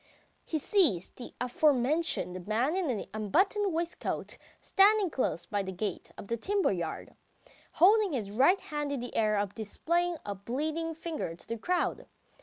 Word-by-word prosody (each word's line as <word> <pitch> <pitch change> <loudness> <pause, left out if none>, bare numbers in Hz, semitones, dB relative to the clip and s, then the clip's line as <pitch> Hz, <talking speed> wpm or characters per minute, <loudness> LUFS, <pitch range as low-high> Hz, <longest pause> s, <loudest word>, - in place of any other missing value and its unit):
He 320 - -2
sees 295 - +2
the 245 - -10
aforementioned 250 - +1
man 240 +10 +1
in 320 - 0
the - - -6
unbuttoned 375 - +1
waistcoat 335 +1 -3 0.2
standing 405 -2 +4
close 175 -9 -1
by 205 -1 -1
the 190 -1 -5
gate 190 0 -4
of - - -8
the 235 - -1
timber 395 - +1
yard, 170 -4 -4 0.6
holding 400 +1 +5
his 210 -7 -3
right 275 - +4
hand 295 -4 -4
in 280 - -2
the 245 +1 -6
air 215 -1 +2
and 200 -1 -1
displaying 340 - -1
a 205 - -3
bleeding 310 - -3
finger 315 - -4
to - - -16
the 230 - -3
crowd. 350 +11 -1
275 Hz, 160 wpm, -30 LUFS, 210-345 Hz, 0.6 s, holding